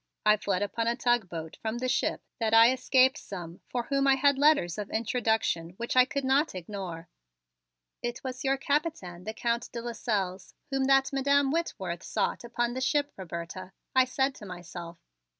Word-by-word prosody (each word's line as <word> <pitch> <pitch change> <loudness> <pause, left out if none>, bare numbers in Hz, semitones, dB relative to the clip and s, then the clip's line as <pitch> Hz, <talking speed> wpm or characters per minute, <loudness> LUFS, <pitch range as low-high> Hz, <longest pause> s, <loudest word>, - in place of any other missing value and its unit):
I 210 0 +7
fled 200 -1 -1
upon 230 +3 -2
a 235 - +2
tug 240 -5 +1
boat 160 -2 -6
from 220 +1 -2
the 255 +1 -2
ship 255 - 0 0.2
that 225 -1 +2
I 230 +2 +8
escape 260 +1 +4
some 175 - -8
for 245 -1 -1
whom 275 +2 +1
I 270 - +6
had 275 0 +3
letters 285 - +3
of 205 - -4
introduction 220 -7 0
which 235 +2 -3
I 255 0 +7
could 280 0 -3
not 270 -1 +2
ignore." 180 -2 -6 0.9
"It 240 0 -4
was 255 -1 -5
your 270 0 +2
Capitaine, 270 - -2
the 220 - -4
Count 235 +1 -1
de 235 - -5
Lasselles, 210 -6 -3 0.2
whom 270 -1 +1
that 270 0 +4
Madam 280 0 +3
Whitworth 190 - -2
sought - - -1
upon 240 0 -1
the 260 - -4
ship, 290 +2 +1
Roberta," 185 +1 -7 0.2
I 260 0 +6
said 265 +2 0
to 210 - -10
myself. 175 -1 -8
235 Hz, 180 wpm, -29 LUFS, 190-265 Hz, 0.9 s, I